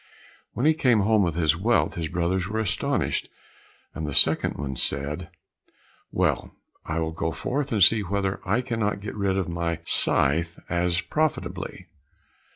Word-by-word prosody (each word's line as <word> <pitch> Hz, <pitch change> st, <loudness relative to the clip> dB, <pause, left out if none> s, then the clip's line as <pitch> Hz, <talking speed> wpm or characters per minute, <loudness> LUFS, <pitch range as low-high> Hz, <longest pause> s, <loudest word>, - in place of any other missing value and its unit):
When 125 Hz, -, -1 dB
he 160 Hz, -, +6 dB
came 125 Hz, -9 st, +3 dB
home 110 Hz, +1 st, +3 dB
with 85 Hz, -5 st, 0 dB
his 80 Hz, -3 st, +2 dB
wealth 95 Hz, -4 st, +1 dB
his 85 Hz, -2 st, -3 dB
brothers 90 Hz, +2 st, -1 dB
were 110 Hz, +3 st, -2 dB
astonished, 110 Hz, -4 st, 0 dB, 0.6 s
and 80 Hz, -, -4 dB
the 75 Hz, -, -4 dB
second 65 Hz, -3 st, +3 dB
said, 75 Hz, +5 st, -1 dB, 0.8 s
"Well, -, -, 0 dB, 0.3 s
I 80 Hz, -, -3 dB
will 80 Hz, -1 st, -1 dB
go 80 Hz, 0 st, -2 dB
forth 135 Hz, -, -3 dB
and 105 Hz, -4 st, +4 dB
see 110 Hz, +4 st, +6 dB
whether 100 Hz, 0 st, -2 dB
I 105 Hz, +6 st, +1 dB
cannot 115 Hz, -5 st, -2 dB
get 105 Hz, -, -6 dB
rid 100 Hz, -2 st, 0 dB
of 95 Hz, -1 st, -1 dB
my 85 Hz, -1 st, -2 dB
scythe 85 Hz, +5 st, +1 dB
as 85 Hz, 0 st, +1 dB
profitably." 155 Hz, -, -2 dB
90 Hz, 155 wpm, -25 LUFS, 85-110 Hz, 0.8 s, he